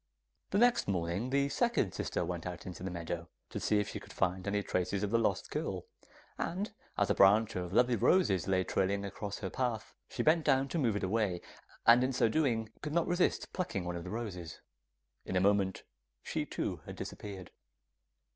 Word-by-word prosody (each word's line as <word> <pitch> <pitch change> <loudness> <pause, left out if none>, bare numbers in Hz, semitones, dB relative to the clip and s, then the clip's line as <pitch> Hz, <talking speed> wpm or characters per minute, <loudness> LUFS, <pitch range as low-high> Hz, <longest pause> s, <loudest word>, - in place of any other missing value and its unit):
The 200 - +1
next 240 +2 +4
morning 90 +4 -1
the 140 +1 +2
second 190 - +1
sister - - -2
went - - -4
out - - -6
into 90 -2 -7
the 95 - -3
meadow, 85 -1 -4 0.2
to - - -3
see 105 - +2
if 105 - -1
she - - -5
could - - -13
find 95 0 0
any 100 0 0
traces 95 +2 -1
of 105 - -1
the 115 - +4
lost 105 -4 0
girl, - - -3 0.5
and 200 +5 -2 0.2
as 100 - +2
a - - +5
branch 105 +3 +5
of 90 -1 -3
lovely 120 +4 +4
roses 100 - +3
lay 95 -1 +2
trailing 100 +2 0
across 100 +1 -5
her 95 -3 -4
path, 120 -4 -2 0.2
she - - -2
bent 160 +1 +4
down 135 -1 +3
to 170 - -1
move 115 -7 +2
it 105 - -2
away, 95 -2 +1 0.5
and 120 +2 +7
in 130 +1 0
so 125 - +3
doing, 115 -6 +1
could 150 0 -4
not 170 0 +3
resist 175 0 +1
plucking 135 - -2
one 90 0 -3
of 85 - -5
the 90 - -7
roses. 90 -7 -5 0.6
In 95 - -4
a - - +4
moment 100 0 +2 0.4
she - - -2
too - - -2
had - - -6
disappeared. 95 -3 -7
105 Hz, 200 wpm, -33 LUFS, 95-130 Hz, 0.6 s, and